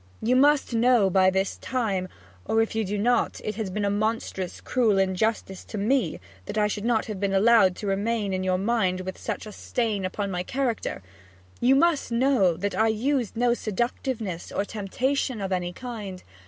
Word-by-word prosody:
'You 245 +3 +1
must 285 0 +4
know 230 -4 +4
by 185 0 +5
this 190 +1 -1
time 205 -8 -2 0.4
or 225 - +1
if 225 - +1
you 220 0 0
do 205 +1 -2
not, 240 +4 +1
it 215 - -2
has 215 -2 -4
been 205 +2 -2
a - - +2
monstrous 205 -3 -2
cruel 230 -6 +1
injustice 195 +1 0
to 215 - -7
me 220 - +1 0.3
that - - -4
I 210 - +3
should 210 0 -2
have 220 -3 0
been 200 0 0
allowed 200 -2 +5
to 210 - -7
remain 205 +1 0
in 185 0 -1
your 185 -1 +1
mind 190 -3 0
with 185 0 -6
such - - -4
a 215 - -8
stain 215 -2 -2
upon 195 +2 -3
my 180 -1 -2
character 240 - -2 0.6
you 255 +3 +4
must 320 -3 +2
know 235 -8 +3
that 200 +2 -2
I 220 - +2
used 235 +1 0
no 240 0 +3
seductiveness 225 -4 -3
or 200 - -1
temptation 245 +5 -2
of 195 -1 -3
any 180 -1 -1
kind. 205 -4 -7
215 Hz, 185 wpm, -26 LUFS, 190-235 Hz, 0.6 s, by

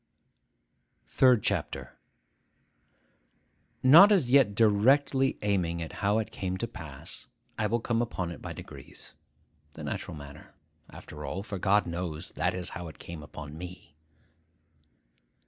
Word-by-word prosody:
THIRD 125 -5 +4
CHAPTER - - -3 1.8
NOT 165 +11 +9
as 160 -12 +3
yet 130 -7 +5
directly 130 +6 +3
aiming 90 -5 0
at 80 -1 -6
how 100 +1 +2
it 110 - -2
came 95 -1 -3
to 115 - -3
pass, 80 -11 -10 0.3
I 110 - 0
will 115 +2 0
come 115 0 0
upon 95 -7 -3
it 85 - -9
by - - -6
degrees. - - -11 0.6
The - - -8
natural - - -5
manner, 70 +1 -12 0.3
after - - -10
all, 95 - -4
for 100 -2 -6
God 100 +2 +3
knows 85 -2 -5
that - - -1
is 90 -1 -3
how 85 0 -7
it 80 - -11
came 85 -2 -9
upon 75 0 -9
me. 90 -2 -10
100 Hz, 135 wpm, -29 LUFS, 85-120 Hz, 1.8 s, NOT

